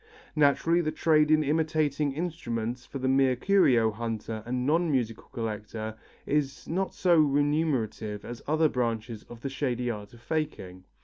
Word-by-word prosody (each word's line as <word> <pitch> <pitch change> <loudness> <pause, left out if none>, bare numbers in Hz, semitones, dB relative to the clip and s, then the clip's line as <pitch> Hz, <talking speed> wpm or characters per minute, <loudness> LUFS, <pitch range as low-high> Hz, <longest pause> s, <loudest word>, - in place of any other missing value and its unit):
Naturally 155 +3 +3
the 155 -2 -1
trade 155 -2 +3
in 155 0 +4
imitating 155 -1 +1
instruments 125 -7 -4
for - - -6
the 130 0 -2
mere 130 -1 +3
curio 125 - +4
hunter 110 0 -4
and 125 +1 -1
non 165 +4 +2
musical 120 -6 -1
collector, 110 -1 -4 0.3
is 140 -2 -1
not 190 +3 -2
so 175 -3 +4
remunerative 140 -8 +1
as 120 0 -7
other 155 +2 +3
branches 115 -4 -2
of 120 -1 -11
the 135 - -3
shady 125 -3 -1
art 105 -2 -7
of - - -16
faking. 115 - -4
135 Hz, 150 wpm, -28 LUFS, 115-155 Hz, 0.3 s, in